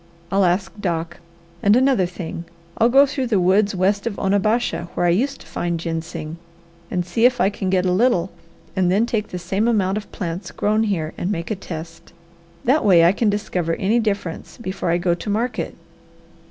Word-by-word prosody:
I'll 195 0 +3
ask 185 +2 0
Doc. 170 -2 -2 0.4
And 205 +2 +5
another 255 -7 +3
thing 170 -1 -6 0.3
I'll 230 +1 +5
go 275 +3 +7
through 270 -2 -2
the 215 -5 +2
woods 195 +3 +3
west 200 +4 +1
of 210 - -3
Onabasha 205 0 +1
where - - +1
I - - +4
used 260 +11 0
to - - -14
find 170 -1 -3
ginseng, 165 -1 -5 0.5
and 180 -1 -1
see 225 +7 +1
if 250 -1 -2
I 200 - +3
can 195 -2 -3
get 185 -1 +2
a 180 - +2
little 190 -3 +2 0.4
and 185 -2 +2
then 205 +5 +3
take 220 -3 -2
the 180 - -6
same 190 +5 -1
amount 200 -4 +1
of 205 - -14
plants 175 +1 -5
grown 215 +2 +1
here, 165 -7 -2
and 185 - -1
make 170 +1 -3
a - - 0
test. 165 -3 -9 0.5
That 275 +6 +3
way 175 -5 +6
I 170 - +6
can 210 +2 +1
discover 180 -5 -1
any 215 +5 +1
difference 200 -7 -3
before 190 -6 -4
I 170 - +3
go 175 0 +1
to 175 +5 -5
market. 230 +4 -2
190 Hz, 195 wpm, -21 LUFS, 175-215 Hz, 0.5 s, go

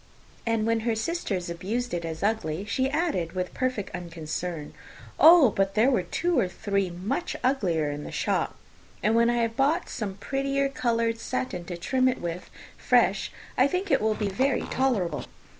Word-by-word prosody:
And 225 -1 +1
when 230 0 +2
her 225 0 0
sisters 220 - -2
abused 215 +8 -3
it 170 -1 -2
as 160 +1 -5
ugly, 200 -5 -1
she 260 +5 0
added, 290 - -1
with 180 -1 -3
perfect 255 -6 -2
unconcern, 165 -2 -5 0.5
"Oh, 320 -7 +8
but 195 0 0
there 230 +5 +4
were 245 - +2
two 325 - 0
or 190 - +2
three 195 +1 -1
much 185 - -3
uglier 175 - +1
in 145 0 -5
the - - -7
shop; - - -1 0.5
and 215 +3 +3
when 235 0 +4
I 240 -1 +2
have 230 0 -2
bought 295 +7 +1
some 205 -6 -4
prettier 275 +5 -1
coloured 230 -3 0
satin 230 -7 -3
to 175 0 -5
trim 255 +9 +1
it 255 - 0
with 170 +1 -5 0.3
fresh, - - +2 0.2
I 255 - +5
think 365 +6 -2
it - - +4
will 215 0 +2
be 210 - -1
very 260 +7 +1
tolerable. 240 -10 0
220 Hz, 175 wpm, -27 LUFS, 180-260 Hz, 0.5 s, Oh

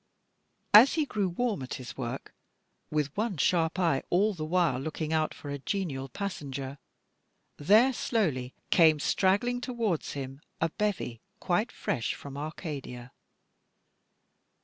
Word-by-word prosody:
As 230 +6 +9
he 315 -2 +2
grew 205 -8 -1
warm 215 - -1
at 130 - -5
his 125 -1 -8
work, 125 0 -5 0.6
with 150 -2 -1
one 210 -3 -1
sharp 165 +2 +2
eye 165 -7 +2
all 205 +4 +3
the 160 -5 -5
while 165 -5 +2
looking 155 +2 -3
out 155 -1 +1
for 145 - -8
a 140 - -4
genial 140 -6 -3
passenger, 140 -6 -5 0.8
there 215 - +5
slowly 150 - -1 0.2
came 160 -3 +6
straggling 205 +10 +2
towards 230 - -2
him 135 0 -6 0.2
a 165 - +1
bevy 185 - -2 0.2
quite 195 +6 0
fresh 120 -6 -2
from 140 -1 -9
Arcadia. 140 -5 -6
160 Hz, 130 wpm, -29 LUFS, 140-200 Hz, 0.8 s, As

